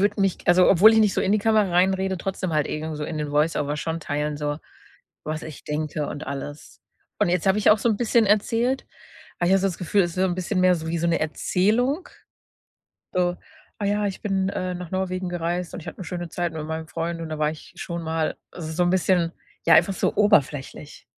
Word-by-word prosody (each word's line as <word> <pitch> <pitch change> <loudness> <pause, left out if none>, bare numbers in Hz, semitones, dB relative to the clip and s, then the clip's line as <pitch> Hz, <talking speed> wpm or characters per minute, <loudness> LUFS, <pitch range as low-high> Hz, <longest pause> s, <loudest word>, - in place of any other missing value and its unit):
würde 205 0 +1
mich- 195 -2 +1
also, 180 +1 +6
obwohl 200 +4 +7
ich 220 - +4
nicht 210 -3 +3
so - - +1
in 195 - +1
die 215 - +3
Kamera 215 -2 +2
reinrede- 190 +1 +2
trotzdem 185 -2 -3
halt 150 -2 +1
irgend 155 0 -4
so 150 - -4
in 155 0 -4
den 150 -1 -3
Voiceover 150 -1 +1
schon 165 +2 -3
teilen, 150 0 -2
so, 145 0 -3 0.7
was 155 +1 -4
ich 155 -2 -9
denke 150 0 -2
und 145 - -6
alles. 145 +2 -7 0.4
Und - - +3
jetzt 180 +1 0
habe 190 +2 +4
ich 210 - +5
auch 210 - +5
so 235 - +1
'n 215 - +2
bisschen 230 -1 +3
erzählt, 230 +5 +1 0.5
aber 175 - +1
ich - - +4
habe 195 - +3
so 195 - +2
das 175 - -6
Gefühl, 190 +3 +2
es 175 - -1
ist - - -11
so 185 - +1
'n 180 -2 0
bisschen 185 +1 -1
mehr 185 0 +5
so 160 -1 -5
wie 165 0 -1
so 170 - 0
'ne 170 - +1
Erzählung, 220 - 0 1.1
so: 180 -1 +1 0.4
„Ah 205 - -3
ja, 205 0 +1
ich 195 - -5
bin, 195 -2 0
äh, 185 -2 -3
nach 180 -2 -7
Norwegen 185 -1 -2
gereist 175 0 -3
und - - -5
ich 170 - -13
hatte - - -8
'ne 185 - -5
schöne 175 0 -5
Zeit 175 +1 -2
mit 160 -1 -5
meinem 160 0 -5
Freund 165 +1 -3
und 165 - -5
da 155 - -4
war 150 0 +2
ich 155 - -11
schon 170 -1 -5
mal,“ 160 -1 -1 0.2
also, 160 -3 -6
so 180 - +1
'n 175 - +2
bisschen 180 -2 +2 0.3
ja, 165 - +7
einfach 195 - +5
so - - 0
oberflächlich. 150 - +1
175 Hz, 240 wpm, -24 LUFS, 160-195 Hz, 1.1 s, obwohl